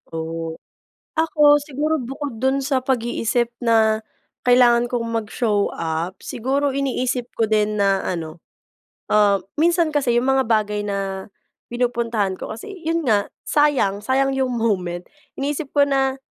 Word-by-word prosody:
Oh. 165 Hz, 0 st, -4 dB, 0.6 s
Ako 300 Hz, -2 st, +5 dB
siguro 295 Hz, +2 st, -1 dB
bukod 270 Hz, -1 st, -5 dB
don 265 Hz, +3 st, +1 dB
sa 265 Hz, -2 st, 0 dB
pag-iisip 240 Hz, -2 st, 0 dB
na 220 Hz, -1 st, +3 dB, 0.4 s
kailangan 245 Hz, -1 st, +5 dB
kong 235 Hz, -1 st, -1 dB
mag-show 215 Hz, -2 st, 0 dB
up, 165 Hz, +2 st, -3 dB
siguro 275 Hz, +4 st, -1 dB
iniisip 255 Hz, -2 st, -2 dB
ko 225 Hz, -2 st, +1 dB
din 210 Hz, -1 st, +1 dB
na 195 Hz, -1 st, +2 dB
ano, 165 Hz, -2 st, -4 dB, 0.7 s
ah, 205 Hz, -2 st, +4 dB, 0.2 s
minsan 335 Hz, 0 st, +3 dB
kasi 260 Hz, -5 st, +2 dB
yung 255 Hz, +2 st, 0 dB
mga 265 Hz, 0 st, +3 dB
bagay 210 Hz, -2 st, 0 dB
na 195 Hz, 0 st, -4 dB, 0.4 s
pinupuntahan 235 Hz, -5 st, 0 dB
ko -, -, -7 dB
kasi 235 Hz, -, -8 dB
'yon 330 Hz, 0 st, 0 dB
nga 205 Hz, -3 st, +2 dB, 0.2 s
sayang, 265 Hz, -10 st, +2 dB
sayang 270 Hz, +1 st, +1 dB
'yong 260 Hz, -2 st, 0 dB
moment. 185 Hz, -7 st, -1 dB, 0.4 s
Iniisip 285 Hz, +1 st, -3 dB
ko 285 Hz, -1 st, +5 dB
na, 270 Hz, -1 st, +1 dB
240 Hz, 135 wpm, -21 LUFS, 210-270 Hz, 0.7 s, Ako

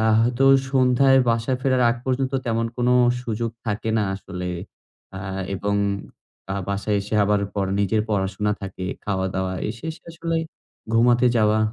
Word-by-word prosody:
আ -, -, +1 dB, 0.2 s
হয়তো 120 Hz, +3 st, +2 dB, 0.3 s
সন্ধ্যায় 135 Hz, 0 st, +4 dB
বাসায় 115 Hz, +3 st, +1 dB
ফেরার 130 Hz, -2 st, +2 dB
আগ 120 Hz, -, -1 dB
পর্যন্ত 130 Hz, +1 st, -1 dB
তেমন 115 Hz, 0 st, 0 dB
কোন 125 Hz, 0 st, +1 dB, 0.3 s
সুযোগ 115 Hz, -1 st, -2 dB, 0.2 s
থাকে 110 Hz, +1 st, -2 dB
না 105 Hz, -, +1 dB
আসলে। 90 Hz, -2 st, -6 dB, 0.7 s
আ -, -, -4 dB, 0.4 s
এবং 100 Hz, +2 st, -1 dB, 0.8 s
আ -, -, -2 dB
বাসায় 100 Hz, +1 st, 0 dB
এসে 100 Hz, +2 st, -5 dB
আবার 105 Hz, 0 st, +2 dB
পড়া 95 Hz, -1 st, -1 dB
নিজের 105 Hz, +2 st, +2 dB
পড়াশোনা 105 Hz, +1 st, 0 dB
থাকে, 95 Hz, -1 st, -6 dB, 0.2 s
খাওয়া-দাওয়া 95 Hz, -1 st, -1 dB
এসে 115 Hz, +7 st, -7 dB
এসে 160 Hz, -, -11 dB
আসলে 165 Hz, 0 st, -2 dB, 0.6 s
ঘুমাতে 120 Hz, +2 st, +4 dB
যাওয়া। 110 Hz, 0 st, +3 dB
110 Hz, 150 wpm, -23 LUFS, 100-125 Hz, 0.8 s, সন্ধ্যায়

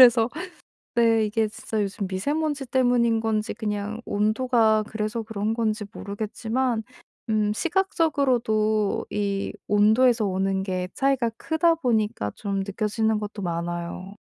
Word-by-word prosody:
그래서 240 Hz, -2 st, +8 dB, 0.7 s
네 225 Hz, -2 st, +4 dB
이게 215 Hz, +1 st, +1 dB
진짜 215 Hz, 0 st, -3 dB
요즘 200 Hz, 0 st, -2 dB
미세 190 Hz, +10 st, -1 dB
먼지 300 Hz, -3 st, -1 dB
때문인 245 Hz, -3 st, +2 dB
건지 220 Hz, -1 st, -1 dB
그냥 210 Hz, 0 st, -3 dB
온도가 220 Hz, +1 st, +2 dB
그래서 220 Hz, +1 st, -3 dB
그런 215 Hz, 0 st, -2 dB
건지 215 Hz, -2 st, 0 dB
모르겠지만 220 Hz, +3 st, -2 dB, 0.5 s
음 210 Hz, -1 st, +2 dB
시각적으로도 255 Hz, -, +1 dB
이 200 Hz, -1 st, -2 dB
온도에서 220 Hz, +3 st, +4 dB
오는 190 Hz, 0 st, 0 dB
게 185 Hz, -1 st, -2 dB
차이가 265 Hz, -4 st, +1 dB
크다 330 Hz, +1 st, +2 dB
보니까 220 Hz, -, 0 dB
좀 200 Hz, -2 st, -2 dB
느껴지는 210 Hz, +2 st, 0 dB
것도 210 Hz, 0 st, -6 dB
많아요. 175 Hz, +2 st, -4 dB
220 Hz, 290 characters per minute, -25 LUFS, 205-240 Hz, 0.7 s, 그래서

